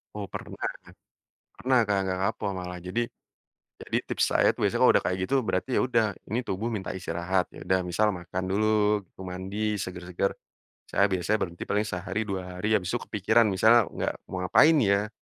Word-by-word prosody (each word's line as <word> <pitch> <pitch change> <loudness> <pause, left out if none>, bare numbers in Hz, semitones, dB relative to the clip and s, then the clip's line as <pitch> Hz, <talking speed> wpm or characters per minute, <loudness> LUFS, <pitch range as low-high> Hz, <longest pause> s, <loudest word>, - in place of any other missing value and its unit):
Oh, 100 -2 -5
pernah. - - -8 1.0
Pernah 130 +1 +3
Kak, 100 -2 0
gak 95 0 -1
kapok 105 - -4
malah. 90 -1 -5
Jadi 95 +7 -2 0.7
jadi - - -3
tips - - +1
saya - - +4
tuh - - -3
biasanya - - +4
udah - - +5
kayak 90 - 0
gitu 135 - +1
berarti 100 +2 -1
ya - - +3
udah 120 -3 +2 0.3
ini 115 - +1
tubuh 110 +5 -2
minta 95 -3 -4
istirahat, 90 0 -1
ya - - -12
udah 95 0 +3
misal 90 +5 +1
makan 90 +1 -5
dulu, 100 +3 +1 0.6
mandi, 100 +4 -2
seger-seger, 90 0 -2 0.6
saya 100 - +4
biasanya 95 +2 0
berhenti 85 -3 -3
paling 105 +1 0
sehari, 95 +2 -3
2 90 -2 -5
hari, 110 +3 +2
habis 95 -2 -1
itu 120 - 0
kepikiran 110 +3 +3
misalnya 110 +2 +5
gak - - -3
mau 95 -1 -4
ngapain 155 - +6
ya, 100 +1 +2
95 Hz, 175 wpm, -27 LUFS, 90-110 Hz, 1.0 s, ngapain